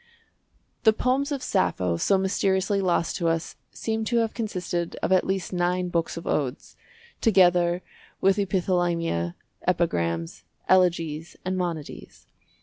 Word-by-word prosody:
The 220 -2 +5
poems 260 +5 0
of 275 -3 -2
Sappho 90 -1 +1
so 195 - +2
mysteriously 190 +1 +1
lost 175 -2 +1
to 170 - 0
us 165 0 -1
seem 220 0 -3
to 235 +2 +1
have 225 -1 +1
consisted 180 -6 -3
of - - 0
at 185 - +3
least 190 -1 -2
nine 180 0 0
books 170 -1 -1
of 170 - -7
odes, 135 -2 -2 0.5
together 180 -4 +4 0.4
with 195 +1 +3
epithalamia, 175 - 0 0.3
epigrams, 85 - 0 0.2
elegies, 170 -4 +2
and 185 0 -1
monodies. 170 -5 -5
180 Hz, 130 wpm, -25 LUFS, 165-195 Hz, 0.5 s, The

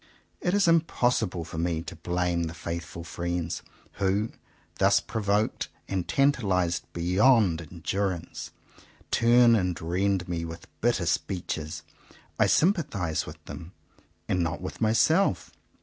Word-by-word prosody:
It 180 +2 0
is 205 - +4
impossi 160 - +2
ble 85 -2 -5
for 80 0 -6
me 85 -1 -1
to - - -8
blame 90 -1 -1
the 80 +1 -6
faithful 85 0 -5
friends, 85 -1 -3 0.4
who, 100 +3 +1 0.5
thus 100 +1 +5
provoked 105 0 -1 0.2
and 95 -3 -2
tantalized 95 - +1
beyond 90 +1 +3
endurance, 90 +2 -3 0.6
turn 120 0 +5
and 90 -5 0
rend 90 +2 0
me 85 -2 -2
with 85 0 -7 0.2
bitter 115 -6 +2
speeches. 85 -3 -2 0.6
I - - +5
sympathize 140 - +1
with - - -11
them, 85 +3 -9 0.5
and 90 - +1
not 85 -1 -1
with 95 - -7
myself. 155 - +3
90 Hz, 125 wpm, -27 LUFS, 85-110 Hz, 0.6 s, thus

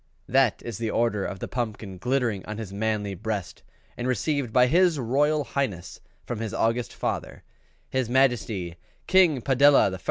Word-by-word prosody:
That 130 -3 +2
is 115 -5 -5
the 115 -1 -2
Order 110 -3 0
of 100 - -5
the - - -5
Pumpkin 105 -6 -5
glittering 120 -3 0
on 105 0 -5
his 105 -4 -7
manly 105 -1 -1
breast 105 -1 -5 0.3
and 120 - -4
received 135 -1 -1
by 125 +2 +5
his 170 +4 +3
Royal 145 +5 +1
Highness 115 -8 -4 0.2
from 120 - -4
his 110 -1 -4
august 115 +2 0
father, - - -4 0.4
his 130 -3 -1
Majesty 115 -9 +1 0.3
King 175 -10 +4
PADELLA 140 -3 +5
I. 95 - -6
120 Hz, 160 wpm, -25 LUFS, 105-135 Hz, 0.4 s, by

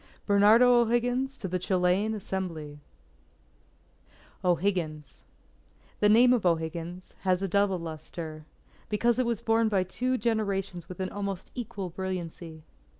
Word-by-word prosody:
_ - - -38
BERNARDO 220 +5 +6
O'HIGGINS, 245 +3 0
to 205 - -5
the 185 0 -2
Chilean 185 +4 +1
Assembly 170 -7 -5 1.6
O'HIGGINS 175 -4 -1 0.8
_The 210 - +5
name 245 +4 +6
of 240 - +1
O'Higgins... 170 +1 -2
has 185 0 +1
a - - 0
double 200 0 +2
lustre; 155 -1 -7 0.4
because 235 +3 +1
it 255 - +2
was 235 -3 -2
borne 225 0 +3
by 195 -3 +2
two 250 +7 -1
generations 195 -7 -2
with 185 0 -7
an 185 - -3
almost 200 -2 -5
equal 200 -7 -5
brilliancy. 170 -3 -6
190 Hz, 130 wpm, -28 LUFS, 175-220 Hz, 1.6 s, BERNARDO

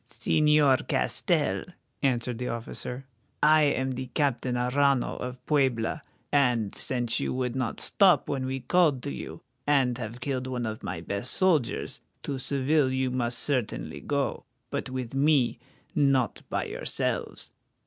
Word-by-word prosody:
"Señor 150 -3 +3
Castell," - - +1 0.4
answered 125 -3 0
the 125 - -3
officer, 125 +3 -5 0.4
"I 155 +1 +6
am 130 -2 +1
the 130 0 -4
Captain 130 -2 0
Arrano 130 +2 +2
of 125 0 -6
Puebla, 135 -2 +1 0.3
and, 125 -7 +2
since 120 -3 0
you - - -1
would 125 -1 -1
not 130 -3 -2
stop 185 -8 +4
when 130 -2 -2
we 130 0 -3
called 160 -7 +2
to 140 - -3
you, - - -8 0.2
and 130 -4 +3
have 115 +1 -6
killed 130 0 -2
one 125 -2 -2
of 110 0 -4
my 80 - -4
best 100 +8 -3
soldiers, 165 -10 +1 0.2
to 135 -2 -3
Seville 140 +1 +1
you 130 -1 0
must 120 -1 0
certainly 130 -6 -1
go, 140 -1 -2 0.3
but 140 -1 -3
with 130 -2 -4
me, 135 -3 +3 0.3
not 140 -4 +2
by - - -1
yourselves. - - -3
130 Hz, 145 wpm, -27 LUFS, 125-140 Hz, 0.4 s, I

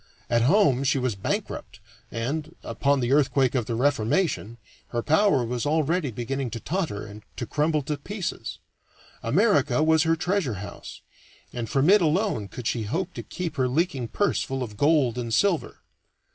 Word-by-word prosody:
At 120 0 +3
home 140 - +4
she 140 0 +2
was 130 -3 0
bankrupt 95 -1 -4 0.3
and, 150 +8 -3
upon 140 -1 +1
the 120 +1 0
earthquake 135 -2 +3
of 120 -4 -1
the 115 - -1
Reformation, 120 - 0 0.3
her 120 -1 -3
power 160 - +3
was 120 0 -3
already 160 +1 +1
beginning 125 +3 -3
to 115 - -5
totter 160 - -3
and 105 +1 -10
to 120 - -4
crumble 150 +3 0
to 150 +2 -3
pieces. 195 +6 -5 0.6
America 145 - +3
was 160 0 +4
her 165 0 +3
treasure 175 - -1
house, 100 +2 -9 0.5
and 120 -2 -4
from 135 +2 +2
it 210 -1 +6
alone 165 - +1
could 120 +4 -9
she 115 - 0
hope 170 - -2
to - - -5
keep 170 -4 -5
her 130 -1 +2
leaking 135 -2 0
purse 205 - 0
full 135 -1 -3
of 105 -4 -7
gold 140 -2 +2
and 115 -2 -1
silver. 195 -5 +1
140 Hz, 170 wpm, -25 LUFS, 120-160 Hz, 0.6 s, it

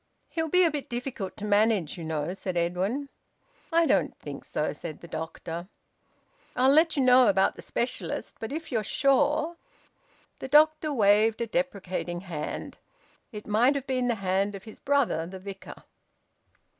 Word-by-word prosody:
"He'll 325 -1 -2
be 365 +3 +5
a 335 - +3
bit 295 -2 -5
difficult 240 -5 -5
to 210 - -5
manage, 210 -5 +2
you 170 - -7
know," 160 +1 -2
said 185 -2 -4
Edwin. 190 +11 -1 0.6
"I 335 0 +4
don't - - +1
think - - -8
so," - - -2
said 160 -3 -8
the 170 - -10
doctor. 165 +2 -6 0.9
"I'll 260 +2 +4
let 315 +2 +4
you 275 - +3
know 250 -1 +6
about 195 -1 +3
the - - -10
specialist. 240 - -3
But 225 - -5
if 315 +1 -5
you're 225 -3 0
sure 290 - +2 0.4
" - - -36
The - - -5
doctor 310 +2 +4
waved 215 -2 +4
a 235 - 0
deprecating 195 -8 -3
hand. 170 -5 -6 0.5
It 210 -2 -8
might 235 +7 +3
have 275 -2 -3
been 255 -2 0
the 240 - +1
hand 195 +2 +1
of 195 - -9
his 220 - -12
brother, 275 - +1
the 190 +2 -8
Vicar. 195 0 -10
225 Hz, 170 wpm, -27 LUFS, 190-275 Hz, 0.9 s, know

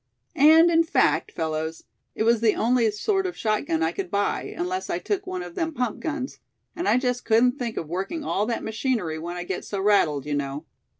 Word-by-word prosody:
And 320 +4 +7
in 330 0 +5
fact, 325 - +1
fellows, 160 0 -3 0.3
it - - 0
was 230 0 +3
the 220 -2 +3
only 235 0 +2
sort 385 - 0
of 360 - -6
shotgun 210 -7 0
I 160 - +1
could 185 0 -5
buy, 200 +1 -1
unless 365 +2 -3
I - - 0
took 400 -2 -3
one 185 -1 -3
of 175 -1 -9
them 325 - -2
pump 245 -4 -2
guns; 295 -4 -4 0.4
and 350 +1 -3
I - - +4
just 250 -1 -1
couldn't 245 +4 +3
think 235 -3 -3
of 160 - -3
working 195 - -3
all 210 -5 0
that 235 - -2
machinery 220 -8 -2
when 175 +2 -5
I 175 - -4
get 180 0 -4
so 200 - -4
rattled, 165 -9 +2
you 150 - -3
know." 145 +2 -3
220 Hz, 215 wpm, -25 LUFS, 175-280 Hz, 0.4 s, And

